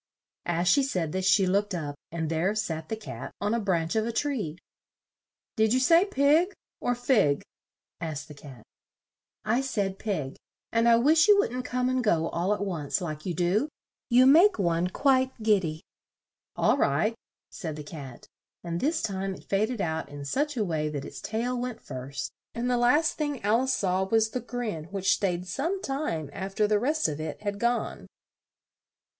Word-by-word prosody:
As 175 Hz, +1 st, 0 dB
she 280 Hz, -, +5 dB
said 180 Hz, -, -1 dB
this, 185 Hz, +1 st, -1 dB
she 195 Hz, +1 st, +5 dB
looked 200 Hz, +1 st, +1 dB
up, 150 Hz, -4 st, -3 dB, 0.2 s
and 160 Hz, -1 st, -2 dB
there 165 Hz, +6 st, 0 dB
sat 160 Hz, -7 st, -3 dB
the 220 Hz, -, -1 dB
Cat 220 Hz, -1 st, -8 dB
on 205 Hz, +2 st, 0 dB
a 235 Hz, -, +1 dB
branch 170 Hz, -5 st, 0 dB
of 220 Hz, 0 st, +1 dB
a -, -, -1 dB
tree. 225 Hz, -, -2 dB, 1.0 s
"Did 220 Hz, +2 st, +3 dB
you -, -, +3 dB
say 330 Hz, +8 st, +5 dB
pig, 325 Hz, +2 st, +3 dB, 0.3 s
or 245 Hz, -, 0 dB
fig?" 230 Hz, -, +2 dB, 0.6 s
asked 160 Hz, -3 st, -5 dB
the 150 Hz, -, -10 dB
Cat. 140 Hz, -5 st, -13 dB, 0.8 s
"I 235 Hz, +4 st, +2 dB
said 200 Hz, -8 st, -2 dB
pig; 155 Hz, -11 st, -3 dB, 0.3 s
and 230 Hz, +1 st, +3 dB
I 230 Hz, -, +7 dB
wish 310 Hz, -, +5 dB
you 415 Hz, -1 st, +7 dB
wouldn't 255 Hz, -, 0 dB
come 250 Hz, 0 st, 0 dB
and 255 Hz, 0 st, +1 dB
go, 165 Hz, -7 st, +2 dB
all 175 Hz, +4 st, -1 dB
at 205 Hz, -1 st, 0 dB
once, 160 Hz, -6 st, -2 dB
like 155 Hz, -2 st, -5 dB
you 175 Hz, -, -2 dB
do; 185 Hz, -, +1 dB, 0.4 s
you 250 Hz, +1 st, +6 dB
make 335 Hz, +9 st, +6 dB
one 170 Hz, -2 st, +1 dB
quite 260 Hz, +5 st, +1 dB
gid 210 Hz, -3 st, +4 dB
dy." 155 Hz, -2 st, -5 dB, 0.7 s
"All -, -, +3 dB
right," 160 Hz, +11 st, +2 dB, 0.4 s
said 160 Hz, -6 st, -5 dB
the 150 Hz, -, -7 dB
Cat; 140 Hz, -5 st, -9 dB, 0.4 s
and 170 Hz, 0 st, -3 dB
this 310 Hz, -, 0 dB
time 195 Hz, -2 st, -2 dB
it -, -, -14 dB
faded 215 Hz, +3 st, 0 dB
out 160 Hz, -2 st, -2 dB
in 145 Hz, 0 st, -8 dB
such 290 Hz, -, -1 dB
a 215 Hz, -, +1 dB
way 155 Hz, -4 st, -1 dB
that 145 Hz, -2 st, -5 dB
its -, -, -9 dB
tail 235 Hz, +4 st, -2 dB
went 245 Hz, -1 st, -4 dB
first, 130 Hz, +1 st, -6 dB, 0.2 s
and 245 Hz, +2 st, -1 dB
the -, -, +3 dB
last 295 Hz, +8 st, +3 dB
thing 290 Hz, -3 st, -1 dB
Al 215 Hz, +4 st, +3 dB
ice 260 Hz, 0 st, +1 dB
saw 190 Hz, -2 st, 0 dB
was 220 Hz, +2 st, +2 dB
the 250 Hz, -, -2 dB
grin 225 Hz, -9 st, -4 dB
which 195 Hz, +2 st, +1 dB
stayed 180 Hz, -3 st, -1 dB
some 330 Hz, -, -2 dB
time 270 Hz, -, -3 dB
af 195 Hz, +1 st, -6 dB
ter 215 Hz, -, +3 dB
the 210 Hz, 0 st, +2 dB
rest 300 Hz, +7 st, +1 dB
of 155 Hz, 0 st, -4 dB
it 155 Hz, -1 st, -5 dB
had 205 Hz, -1 st, -3 dB
gone. 235 Hz, +1 st, -1 dB
205 Hz, 190 wpm, -27 LUFS, 165-250 Hz, 1.0 s, I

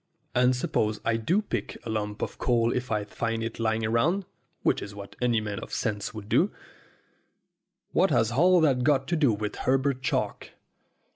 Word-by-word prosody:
and 125 Hz, +1 st, +4 dB
suppose 110 Hz, -3 st, 0 dB
I 115 Hz, -, +2 dB
do 175 Hz, -, +1 dB
pick -, -, -3 dB
up -, -, -25 dB
a -, -, -5 dB
lump 105 Hz, -1 st, -3 dB
of -, -, -5 dB
coal 120 Hz, -1 st, +2 dB
if 125 Hz, -1 st, -3 dB
I 105 Hz, -1 st, +1 dB
find 115 Hz, +2 st, -3 dB
it 115 Hz, -, -5 dB
lying 110 Hz, 0 st, 0 dB
about 150 Hz, -, +1 dB, 0.4 s
which -, -, +2 dB
is 100 Hz, 0 st, -7 dB
what 100 Hz, -1 st, -9 dB
any 120 Hz, -2 st, +3 dB
man 105 Hz, -2 st, -4 dB
of -, -, -9 dB
sense 105 Hz, -3 st, -2 dB
would 110 Hz, -2 st, -8 dB
do -, -, +3 dB, 1.4 s
what -, -, +3 dB
has 110 Hz, +1 st, +2 dB
all 175 Hz, +8 st, +5 dB
that 135 Hz, -5 st, +3 dB
got 135 Hz, -1 st, +2 dB
to 175 Hz, -, +2 dB
do 145 Hz, -6 st, +4 dB
with 105 Hz, 0 st, -3 dB
Her 130 Hz, +1 st, +2 dB
bert 135 Hz, -1 st, -1 dB
Chalk? -, -, -2 dB
115 Hz, 195 wpm, -27 LUFS, 110-130 Hz, 1.4 s, all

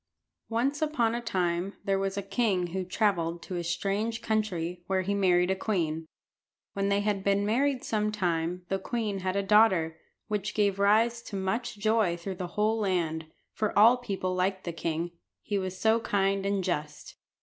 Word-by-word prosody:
Once 260 Hz, +6 st, 0 dB
upon 285 Hz, -8 st, +1 dB
a 240 Hz, -, -2 dB
time 185 Hz, -3 st, -1 dB
there 195 Hz, -1 st, +1 dB
was 195 Hz, 0 st, -2 dB
a 200 Hz, -, -2 dB
king 195 Hz, -2 st, +1 dB
who 190 Hz, 0 st, -1 dB
travelled 180 Hz, -3 st, 0 dB
to 185 Hz, -, -6 dB
a 175 Hz, -, -2 dB
strange 200 Hz, +6 st, -1 dB
country, 180 Hz, -6 st, -1 dB
where 190 Hz, -1 st, +1 dB
he 200 Hz, +2 st, -1 dB
married 180 Hz, -2 st, +3 dB
a -, -, +2 dB
queen. 165 Hz, -6 st, -1 dB, 0.7 s
When 200 Hz, 0 st, 0 dB
they 200 Hz, 0 st, +2 dB
had 205 Hz, -2 st, -1 dB
been 200 Hz, 0 st, +2 dB
married 260 Hz, +4 st, +1 dB
some 215 Hz, -1 st, 0 dB
time 175 Hz, -3 st, -1 dB
the 195 Hz, 0 st, -1 dB
queen 210 Hz, -1 st, -2 dB
had 185 Hz, 0 st, -2 dB
a 200 Hz, -, +1 dB
daughter, 190 Hz, -6 st, +4 dB, 0.3 s
which 210 Hz, -1 st, -2 dB
gave 200 Hz, -2 st, +2 dB
rise 225 Hz, +4 st, +3 dB
to 220 Hz, -, -8 dB
much 195 Hz, +4 st, -2 dB
joy 215 Hz, -4 st, +2 dB
through 185 Hz, +2 st, -6 dB
the 180 Hz, -1 st, -3 dB
whole 215 Hz, +2 st, +2 dB
land, 165 Hz, -6 st, -1 dB, 0.3 s
for 215 Hz, -1 st, -1 dB
all 225 Hz, +4 st, +8 dB
people 195 Hz, -7 st, -3 dB
liked 185 Hz, +1 st, 0 dB
the 170 Hz, -, -4 dB
king, 165 Hz, +1 st, -2 dB, 0.3 s
he 205 Hz, -1 st, -1 dB
was 185 Hz, -1 st, -4 dB
so 220 Hz, +1 st, +3 dB
kind 195 Hz, -2 st, 0 dB
and 200 Hz, -1 st, 0 dB
just. 150 Hz, -5 st, -4 dB
195 Hz, 180 wpm, -28 LUFS, 180-215 Hz, 0.7 s, all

